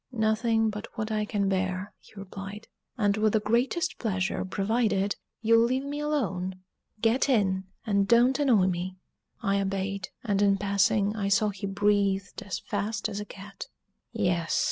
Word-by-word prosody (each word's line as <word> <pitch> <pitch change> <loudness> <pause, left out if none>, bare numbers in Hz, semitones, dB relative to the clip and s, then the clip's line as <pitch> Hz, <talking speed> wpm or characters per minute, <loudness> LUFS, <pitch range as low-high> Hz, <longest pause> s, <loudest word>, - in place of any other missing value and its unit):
"Nothing 225 -1 +2
but 210 +2 -6
what 215 0 -3
I 215 -1 0
can 205 -2 0
bear," 190 0 -1
he - - -20
replied, 200 +2 -8 0.3
"and 205 -2 +2
with 215 -1 +2
the 220 - +4
greatest 250 - 0
pleasure, 190 -5 -1
provided 200 0 0 0.3
you'll 230 +1 +5
leave 260 +3 0
me 290 +1 -4
alone 200 -12 -1 0.5
get 235 +5 +2
in, 190 -6 +2 0.2
and 200 -3 +2
don't 240 +4 +4
annoy 240 -10 +4
me." 185 0 -2 0.5
I 200 -1 +2
obeyed; 195 0 -2
and 205 -4 +1
in 200 -1 +4
passing, 200 +1 +2
I 200 -2 -1
saw 200 +2 +3
he 200 0 -5
breathed 200 -1 +1
as 190 - -4
fast 210 +1 -2
as 205 -1 -4
a 210 - -5
cat. 195 -1 -9 0.4
"Yes!" 180 -7 0
205 Hz, 160 wpm, -28 LUFS, 195-225 Hz, 0.5 s, you'll